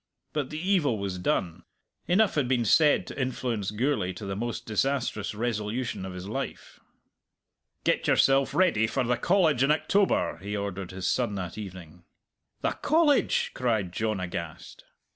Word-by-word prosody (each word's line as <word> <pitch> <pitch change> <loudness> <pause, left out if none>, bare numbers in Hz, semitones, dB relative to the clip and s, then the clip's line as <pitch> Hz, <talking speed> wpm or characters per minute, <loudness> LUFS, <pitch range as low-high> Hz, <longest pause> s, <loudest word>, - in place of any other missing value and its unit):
But 145 -4 -2
the 155 - -5
evil 170 - +2
was 95 -2 -4
done. 90 -1 -1 0.5
Enough 205 +4 +3
had 145 -5 +1
been 125 -2 +1
said 150 - +4
to - - -5
influence 120 -5 -2
Gourlay 105 -4 0
to 95 +3 -8
the 100 0 -3
most 120 +3 -4
disastrous 115 -3 -1
resolution 110 -1 -2
of 95 - -7
his 90 +1 -7
life. 135 +6 -5 1.0
"Get - - +1
yourself 135 0 +3
ready 170 - +3
for 130 +3 0
the 125 0 +1
College 160 -1 +2
in 135 - +3
October," 190 - +2
he 100 +4 -4
ordered 100 -2 -4
his 95 0 -4
son 120 -5 0
that 90 -3 -5
evening. 90 -5 -9 0.6
"The - - +1
College!" 305 -2 +2
cried 110 -8 0
John 110 +1 -1
aghast. 85 -3 -6
115 Hz, 155 wpm, -27 LUFS, 95-135 Hz, 1.0 s, said